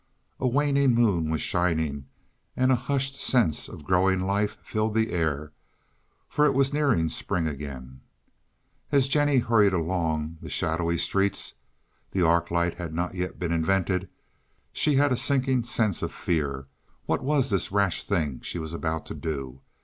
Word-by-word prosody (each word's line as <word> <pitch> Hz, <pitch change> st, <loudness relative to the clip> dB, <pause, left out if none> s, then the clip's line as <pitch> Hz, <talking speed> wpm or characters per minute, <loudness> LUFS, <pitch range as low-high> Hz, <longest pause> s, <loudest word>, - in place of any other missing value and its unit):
A 130 Hz, -, +1 dB
waning 140 Hz, -1 st, +3 dB
moon 100 Hz, -10 st, +2 dB
was 80 Hz, -1 st, -1 dB
shining, 80 Hz, -6 st, 0 dB, 0.5 s
and 130 Hz, 0 st, +3 dB
a -, -, +5 dB
hushed 135 Hz, +2 st, -1 dB
sense 115 Hz, -, +1 dB
of -, -, -10 dB
growing 95 Hz, +3 st, +2 dB
life 100 Hz, +2 st, 0 dB
filled 110 Hz, 0 st, -1 dB
the 110 Hz, 0 st, +1 dB
air, 75 Hz, -3 st, -1 dB, 0.8 s
for 150 Hz, -, +1 dB
it 135 Hz, -, +1 dB
was 135 Hz, +1 st, +2 dB
nearing 140 Hz, -, +2 dB
spring 80 Hz, +1 st, -1 dB
again. 65 Hz, -3 st, -7 dB, 0.9 s
As 140 Hz, -2 st, +4 dB
Jennie 145 Hz, 0 st, +3 dB
hurried 115 Hz, -5 st, +4 dB
along 80 Hz, -2 st, -1 dB
the -, -, -8 dB
shadowy 85 Hz, +1 st, 0 dB
streets—the 95 Hz, 0 st, -3 dB
arc 85 Hz, +1 st, +3 dB
light 85 Hz, +1 st, 0 dB
had 85 Hz, -2 st, -5 dB
not 90 Hz, +2 st, -2 dB
yet 90 Hz, 0 st, -4 dB
been 85 Hz, -3 st, -2 dB
invented—she 95 Hz, -, -2 dB
had 145 Hz, +1 st, +4 dB
a -, -, +3 dB
sinking 130 Hz, 0 st, +1 dB
sense 110 Hz, -5 st, -1 dB
of -, -, -2 dB
fear; 70 Hz, -5 st, -2 dB, 0.4 s
what -, -, -1 dB
was 135 Hz, -3 st, +1 dB
this 95 Hz, -2 st, 0 dB
rash 100 Hz, -3 st, +1 dB
thing 80 Hz, -10 st, -1 dB
she -, -, -4 dB
was 80 Hz, -1 st, -5 dB
about 80 Hz, -1 st, -3 dB
to -, -, -7 dB
do? 70 Hz, -5 st, -5 dB
90 Hz, 155 wpm, -26 LUFS, 80-125 Hz, 0.9 s, a